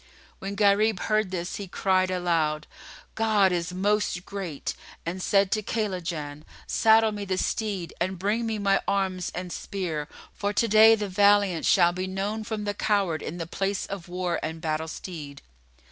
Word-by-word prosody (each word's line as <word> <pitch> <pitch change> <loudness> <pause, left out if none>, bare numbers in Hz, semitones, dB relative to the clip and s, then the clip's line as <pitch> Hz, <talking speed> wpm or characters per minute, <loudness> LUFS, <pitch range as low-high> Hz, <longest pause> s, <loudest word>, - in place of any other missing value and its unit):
When 195 +1 -5
Gharib 205 0 +3
heard 215 -2 +1
this, 180 -1 -4
he 200 - -6
cried 185 0 +1
aloud, 165 -4 0 0.5
"God 215 -4 +3
is 175 0 -1
Most 195 -1 0
Great!" 185 -8 -4 0.3
and 180 +3 -3
said 195 0 +3
to 215 - +1
Kaylajan, 175 -9 -3 0.2
"Saddle 220 0 +4
me 205 -1 -5
the 190 -2 -2
steed 195 -3 -2
and 185 +2 -1
bring 210 +5 0
me 220 -1 -1
my 200 -1 +2
arms 190 -2 0
and 180 0 -5
spear; 165 -7 -4 0.3
for 205 0 -2
to 230 - +2
day 220 +1 +7
the 210 -1 -3
valiant 200 -2 +3
shall 175 -2 +5
be 185 +1 -3
known 200 +3 -3
from 215 -1 -4
the 205 0 -1
coward 195 -8 0
in 170 - -5
the 165 - -4
place 195 +4 -2
of 195 -2 -7
war 180 -1 -2
and 160 +1 -4
battle 160 0 -2
stead." 155 -4 -8
190 Hz, 170 wpm, -26 LUFS, 175-205 Hz, 0.5 s, day